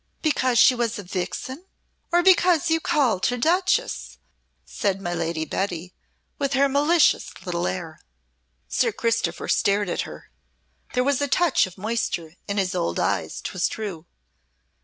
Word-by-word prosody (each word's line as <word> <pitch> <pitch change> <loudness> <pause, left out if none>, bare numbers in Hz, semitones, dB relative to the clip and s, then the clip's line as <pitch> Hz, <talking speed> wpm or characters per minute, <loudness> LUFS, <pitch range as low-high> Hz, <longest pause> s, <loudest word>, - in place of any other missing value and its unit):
"Because 260 -6 +2
she 240 +2 +7
was 235 -2 -1
a 205 - -6
vixen, 200 - -5 0.4
or 350 +1 +4
because 350 -3 +4
you 325 - +3
called 250 - +1
her 245 - -1
Duchess?" 370 - 0 0.5
said 195 -1 -1
my 175 -2 -3
Lady 165 -1 -2
Betty, 180 0 -3 0.5
with 280 -1 0
her 275 +1 +4
malicious 295 +4 +3
little 175 -1 -1
air. 165 -4 -5 0.7
Sir 245 -2 +1
Christopher 230 +2 -1
stared 200 -1 +2
at - - -1
her; - - -10 0.6
there 250 - +3
was 280 0 +1
a 285 - +1
touch 330 - +3
of 185 - -14
moisture 200 -6 -2
in 200 0 -3
his 190 -2 0
old 85 +1 -1
eyes, - - -1
'twas 180 -1 -1
true! 190 -7 -6
230 Hz, 150 wpm, -24 LUFS, 185-285 Hz, 0.7 s, she